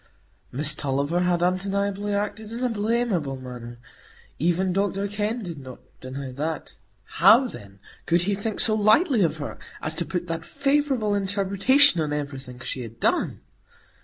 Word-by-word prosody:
Miss 145 Hz, +3 st, +1 dB
Tulliver 145 Hz, +4 st, -1 dB
had 180 Hz, -1 st, +1 dB
undeniably 200 Hz, +2 st, 0 dB
acted 210 Hz, +1 st, -3 dB
in 235 Hz, +2 st, -4 dB
a 250 Hz, -, +2 dB
blamable 210 Hz, -, 0 dB
manner, 120 Hz, -2 st, -8 dB, 0.6 s
even 175 Hz, +4 st, +1 dB
Dr 195 Hz, +1 st, 0 dB
Kenn 210 Hz, +3 st, -2 dB
did 170 Hz, -5 st, -6 dB
not 130 Hz, -2 st, -10 dB, 0.2 s
deny 130 Hz, +1 st, -6 dB
that; 155 Hz, +5 st, -4 dB, 0.3 s
how, 255 Hz, +3 st, +5 dB
then, 100 Hz, -, -11 dB, 0.3 s
could 170 Hz, +1 st, +3 dB
he 200 Hz, +3 st, +1 dB
think 205 Hz, +2 st, -3 dB
so 220 Hz, -, +4 dB
lightly 220 Hz, -, +4 dB
of 165 Hz, -3 st, +1 dB
her 145 Hz, -, -6 dB, 0.2 s
as 155 Hz, -, -1 dB
to 170 Hz, -, +3 dB
put 175 Hz, -1 st, -2 dB
that 165 Hz, -1 st, -4 dB
favourable 275 Hz, -4 st, +1 dB
interpretation 200 Hz, -, +3 dB
on 150 Hz, -1 st, -1 dB
everything 135 Hz, -4 st, -5 dB
she 130 Hz, -, -4 dB
had 115 Hz, -1 st, -9 dB
done? -, -, 0 dB
185 Hz, 155 wpm, -25 LUFS, 145-210 Hz, 0.6 s, how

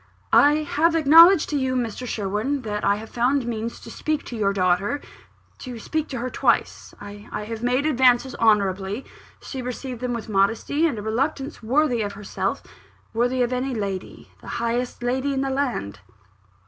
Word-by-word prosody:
"I 295 Hz, +1 st, +5 dB
have 325 Hz, +3 st, +1 dB
acknowledged 330 Hz, +3 st, +7 dB
to -, -, -1 dB
you, 260 Hz, -1 st, 0 dB
Mr. 245 Hz, 0 st, -3 dB
Sherwin, 220 Hz, +7 st, -2 dB
that 210 Hz, -1 st, -3 dB
I 200 Hz, -, +3 dB
have 220 Hz, +2 st, -9 dB
found 250 Hz, +2 st, +1 dB
means 230 Hz, 0 st, -4 dB
to 230 Hz, -, -10 dB
speak 310 Hz, +4 st, -2 dB
to 240 Hz, -, -7 dB
your 205 Hz, -3 st, +1 dB
daughter 195 Hz, +7 st, +1 dB, 0.6 s
to 250 Hz, -3 st, -7 dB
speak 315 Hz, +7 st, -3 dB
to 265 Hz, -, -5 dB
her 245 Hz, +2 st, -3 dB
twice. -, -, 0 dB
I 205 Hz, +1 st, -10 dB, 0.3 s
made 250 Hz, +3 st, +1 dB
my -, -, +1 dB
advances 255 Hz, -2 st, +3 dB
honourably. 205 Hz, 0 st, +1 dB, 0.4 s
She 265 Hz, -, -6 dB
received 250 Hz, 0 st, -6 dB
them 250 Hz, -1 st, -2 dB
with 235 Hz, -1 st, -5 dB
a -, -, -7 dB
modesty 225 Hz, +11 st, +2 dB
and 285 Hz, -, -3 dB
a 205 Hz, -, -5 dB
reluctance 270 Hz, +6 st, -2 dB
worthy 245 Hz, +1 st, +1 dB
of 205 Hz, -1 st, -3 dB
herself, 200 Hz, 0 st, -3 dB, 0.5 s
worthy 245 Hz, +2 st, +1 dB
of 245 Hz, +1 st, -1 dB
any 255 Hz, +1 st, -2 dB
lady, 200 Hz, -3 st, -5 dB
the -, -, -13 dB
highest 240 Hz, +1 st, -2 dB
lady 260 Hz, +3 st, 0 dB
in 265 Hz, -, 0 dB
the 270 Hz, 0 st, -1 dB
land." 260 Hz, -, -2 dB
245 Hz, 175 wpm, -23 LUFS, 215-275 Hz, 0.6 s, acknowledged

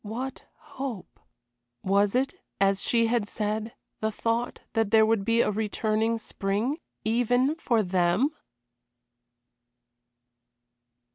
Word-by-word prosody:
What 250 Hz, +5 st, -5 dB, 0.4 s
hope? 245 Hz, -9 st, -5 dB, 0.6 s
Was 200 Hz, +2 st, +2 dB
it, 270 Hz, +2 st, +1 dB, 0.3 s
as 195 Hz, 0 st, +3 dB
she 230 Hz, -1 st, +3 dB
had 225 Hz, -2 st, +1 dB
said, 215 Hz, +2 st, -3 dB, 0.2 s
the 220 Hz, 0 st, 0 dB
thought 230 Hz, +3 st, -2 dB
that 225 Hz, -3 st, +1 dB
there 220 Hz, 0 st, +6 dB
would 220 Hz, -2 st, +2 dB
be 230 Hz, +3 st, +3 dB
a -, -, +1 dB
returning 220 Hz, +1 st, 0 dB
spring 215 Hz, +5 st, -2 dB, 0.3 s
even 245 Hz, +5 st, +2 dB
for 235 Hz, -9 st, +1 dB
them? 180 Hz, -, +2 dB
220 Hz, 110 wpm, -27 LUFS, 205-240 Hz, 0.6 s, there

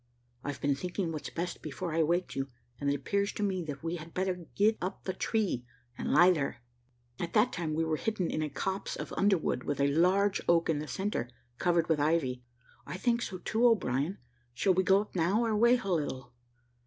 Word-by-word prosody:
I've 145 Hz, -1 st, -4 dB
been 140 Hz, 0 st, +2 dB
thinking 180 Hz, +4 st, -3 dB
what's 155 Hz, -2 st, -5 dB
best 175 Hz, +1 st, -4 dB
before 160 Hz, +3 st, -4 dB
I 165 Hz, -, +2 dB
waked 175 Hz, +3 st, 0 dB
you; 135 Hz, 0 st, -1 dB, 0.3 s
and 140 Hz, -, 0 dB
it 140 Hz, -, +2 dB
appears 200 Hz, +8 st, 0 dB
to 210 Hz, -, -3 dB
me, 190 Hz, -3 st, 0 dB
that 145 Hz, -2 st, -6 dB
we 165 Hz, +1 st, -2 dB
had 165 Hz, +1 st, -11 dB
better 180 Hz, -2 st, -2 dB
get 215 Hz, +2 st, +3 dB
up 185 Hz, +2 st, -4 dB
the 190 Hz, -, -2 dB
tree, 195 Hz, -, 0 dB, 0.3 s
and -, -, -3 dB
lie 180 Hz, +1 st, +7 dB
there." 140 Hz, -7 st, -2 dB, 0.6 s
At 170 Hz, -1 st, -3 dB
that 225 Hz, +3 st, +4 dB
time 160 Hz, -3 st, -2 dB
we 165 Hz, -, +1 dB
were 160 Hz, -1 st, 0 dB
hidden 215 Hz, -3 st, -1 dB
in 155 Hz, -, -1 dB
a 155 Hz, -, -1 dB
copse 190 Hz, +6 st, -3 dB
of -, -, -6 dB
underwood, 195 Hz, -10 st, +2 dB
with 145 Hz, +2 st, -3 dB
a 140 Hz, 0 st, +3 dB
large 190 Hz, +5 st, +3 dB
oak 170 Hz, -1 st, +4 dB
in 150 Hz, -, -1 dB
the 155 Hz, -, -5 dB
centre, 190 Hz, -, -2 dB, 0.3 s
covered 170 Hz, -2 st, +2 dB
with 160 Hz, -2 st, +2 dB
ivy, 145 Hz, -5 st, +1 dB, 0.4 s
"I -, -, -6 dB
think 235 Hz, +4 st, +1 dB
so, 190 Hz, -, -4 dB
too, 220 Hz, +5 st, -1 dB
O'Brien; 175 Hz, -, +1 dB, 0.4 s
shall 185 Hz, +10 st, +3 dB
we 185 Hz, -, +3 dB
go 190 Hz, +2 st, +4 dB
up 210 Hz, -, -10 dB
now, 190 Hz, +7 st, +2 dB
or 220 Hz, -1 st, +1 dB
wait 235 Hz, +3 st, +5 dB
a 195 Hz, -2 st, 0 dB
little?" 135 Hz, -5 st, -3 dB
175 Hz, 215 wpm, -31 LUFS, 150-195 Hz, 0.6 s, lie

